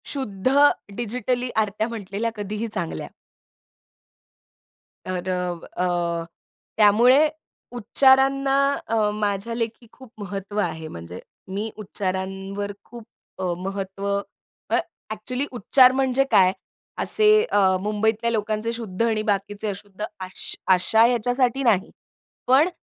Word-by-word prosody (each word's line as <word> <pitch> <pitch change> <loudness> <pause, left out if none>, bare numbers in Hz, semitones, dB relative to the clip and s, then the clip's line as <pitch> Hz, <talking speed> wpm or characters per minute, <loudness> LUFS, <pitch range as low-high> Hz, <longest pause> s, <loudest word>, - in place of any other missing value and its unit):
शुद्ध 255 -4 -2 0.4
डिजिटली 245 +2 -2
आरत्या 215 0 0
म्हटलेल्या 220 0 -3
कधीही 210 +2 -3
चांगल्या. 170 -2 -3 2.0
तर 185 0 -3
अ, 180 -2 -3
अ, 170 -2 0 0.5
त्यामुळे 240 +8 +6 0.5
उच्चारांना 270 +3 +3 0.3
अ, 220 -2 +2
माझ्या 205 +2 -1
लेखी 230 0 -4
खूप 260 -3 -15
महत्त्व 200 +1 -4
आहे. 160 -6 -2
म्हणजे 85 - -9 0.3
मी 210 +3 -2
उच्चारांवर 195 0 -4
खूप 235 -1 -11 0.4
अ, - - -3
महत्त्व 195 +1 -5 0.6
अ, - - +2 0.4
ॲक्चुअली 250 +5 -3
उच्चार 250 +2 +5
म्हणजे 265 0 +2
काय? 185 -1 +6 0.5
असे 430 -1 +1 0.2
अ, 190 -2 +4
मुंबईतल्या 220 +3 0
लोकांचे 215 +1 -1
शुद्ध 225 -4 -5
आणि 220 -2 +1
बाकीचे 205 0 -2
अशुद्ध 200 +1 -7 0.2
अश 185 - -6 0.2
आशा 220 +5 +4
याच्यासाठी 245 +2 +1
नाही. 210 -5 +2 0.6
पण 275 +7 +5
215 Hz, 110 wpm, -23 LUFS, 195-240 Hz, 2.0 s, त्यामुळे